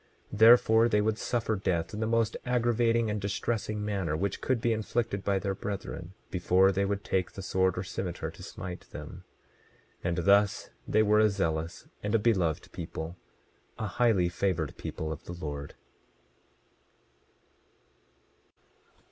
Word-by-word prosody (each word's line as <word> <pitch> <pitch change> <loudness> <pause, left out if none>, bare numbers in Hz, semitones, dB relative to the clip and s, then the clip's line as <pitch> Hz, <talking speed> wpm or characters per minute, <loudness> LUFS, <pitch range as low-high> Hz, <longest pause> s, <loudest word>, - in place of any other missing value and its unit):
27:29 105 - -6
Therefore, 115 0 +7
they 105 -2 +3
would 110 +1 0
suffer 115 -2 0
death 85 -3 -1
in 105 - -4
the 110 - 0
most 115 -1 +1
aggravating 115 -2 +2
and 105 -1 -2
distressing 105 +1 -2
manner 95 -7 -1
which 100 +4 -2
could 130 -2 +1
be 115 0 +1
inflicted 110 -2 -2
by 100 -1 +1
their 95 0 -1
brethren, 95 -3 -6 0.2
before 95 +1 +4
they 100 +1 0
would 100 +1 -2
take 90 -2 0
the 95 - -7
sword 95 -1 +1
or 90 - -1
cimeter 95 -2 -4
to - - -13
smite 90 -1 -8
them. - - -9 0.8
27:30 90 - 0
And 85 - -1
thus 100 0 +4 0.2
they 110 +1 +4
were 105 0 +4
a 110 0 +5
zealous 80 -4 -2
and 105 +1 0
beloved 95 -9 +1
people, 80 0 -6 0.6
a 110 - -3
highly 105 -3 +2
favored 85 -3 -1
people 80 0 -5
of 80 - -6
the 85 - -6
Lord. 75 -4 -6
100 Hz, 150 wpm, -29 LUFS, 90-110 Hz, 0.8 s, Therefore